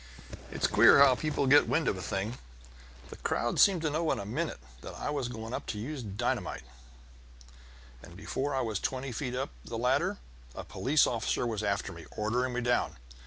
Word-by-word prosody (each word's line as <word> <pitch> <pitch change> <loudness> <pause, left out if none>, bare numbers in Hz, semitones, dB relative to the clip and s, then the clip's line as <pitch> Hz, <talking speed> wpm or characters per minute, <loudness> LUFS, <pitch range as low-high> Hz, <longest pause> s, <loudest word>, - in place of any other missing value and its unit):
It's - - -1
queer - - +7
how 140 -2 +7
people 145 +2 -1
get 140 +2 +6
wind 160 -1 +1
of - - +1
a 95 - -6
thing; 100 +7 -3 0.7
the - - -10
crowd 120 - -1
seemed 185 -5 +5
to 155 - +1
know 160 +1 0
in - - 0
a 100 - -5
minute 150 +10 -3 0.2
that - - -8
I - - -3
was 140 -4 -2
going 115 -1 -7
to 105 - -4
use 135 +6 -5
dynamite, 100 -3 -3 1.4
and 85 +5 -13
before 135 +7 -2
I 135 - +1
was 110 -4 -2
twenty 130 0 -3
feet 125 +1 -3
up 135 +2 -3
the 115 - -6
ladder 125 +3 +1 0.4
a - - -6
police 140 +3 +2
officer 115 +1 -1
was 110 -3 -2
after 100 -2 -1
me, 85 -1 -11
ordering 125 +4 0
me 125 - -1
down. 120 0 +1
125 Hz, 190 wpm, -30 LUFS, 110-140 Hz, 1.4 s, queer